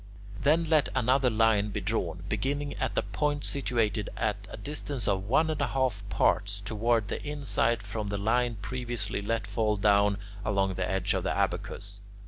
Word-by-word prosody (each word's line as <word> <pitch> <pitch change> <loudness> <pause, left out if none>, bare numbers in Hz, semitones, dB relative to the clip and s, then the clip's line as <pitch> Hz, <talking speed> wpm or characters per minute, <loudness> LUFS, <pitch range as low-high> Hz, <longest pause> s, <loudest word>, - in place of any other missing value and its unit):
Then 155 +6 +4
let 155 -3 +3
another 130 +2 +3
line 110 -2 +3
be 100 - -3
drawn, - - -2
beginning 145 +1 -1
at - - -2
a - - +3
point 145 -1 -1
situated 115 -6 0
at 105 -3 -1
a - - -8
distance 140 +1 -4
of 95 0 +1
one 155 +7 +3
and 155 - -2
a - - +2
half 130 -6 0
parts 100 +2 +1
toward 110 +2 0
the - - -4
inside 135 -6 0
from 105 +1 -4
the 100 - -1
line 120 +3 +1
previously 120 -3 -2
let 110 +1 -1
fall 105 +1 0
down 100 0 +4 0.3
along 95 -2 +1
the 95 0 -2
edge 95 -1 +1
of - - -1
the - - 0
abacus. 100 0 -2
110 Hz, 175 wpm, -29 LUFS, 100-130 Hz, 0.3 s, Then